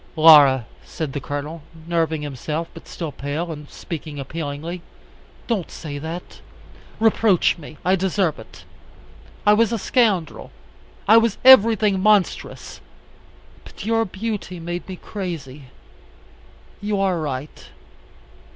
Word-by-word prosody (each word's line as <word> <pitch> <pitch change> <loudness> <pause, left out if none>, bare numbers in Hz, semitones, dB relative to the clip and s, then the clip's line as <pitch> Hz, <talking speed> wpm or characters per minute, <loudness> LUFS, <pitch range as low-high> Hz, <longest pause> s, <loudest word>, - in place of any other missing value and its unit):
"Laura," 145 -6 +7 0.2
said 155 -5 -5
the 140 - -2
Colonel, 145 +4 -5 0.2
nerving 165 -2 -1
himself, 150 +4 -4
but 165 - -13
still 165 -4 -5
pale, 150 +5 -4
and 150 -2 -9
speaking 155 -4 -7
appealingly, 155 +4 -5 0.6
"don't 210 -8 -2
say 145 -3 -7
that. 165 +4 -7 0.6
Reproach 220 -5 +3
me. 155 0 -11
I 185 +1 +4
deserve 190 - 0
it. 110 - -13 0.8
I 210 - +6
was 225 +1 +3
a 230 - 0
scoundrel. 205 - 0 0.6
I 220 +3 +8
was 230 -2 +2
everything 220 -5 +7
monstrous. 210 -2 0 0.8
But - - -11
your 225 0 +2
beauty 200 -2 -5
made 175 +2 -6
me 185 - -5
crazy. 165 -9 -7 1.2
You 205 -1 -1
are 190 -3 +1
right. 145 -1 -5
170 Hz, 120 wpm, -22 LUFS, 150-205 Hz, 1.2 s, I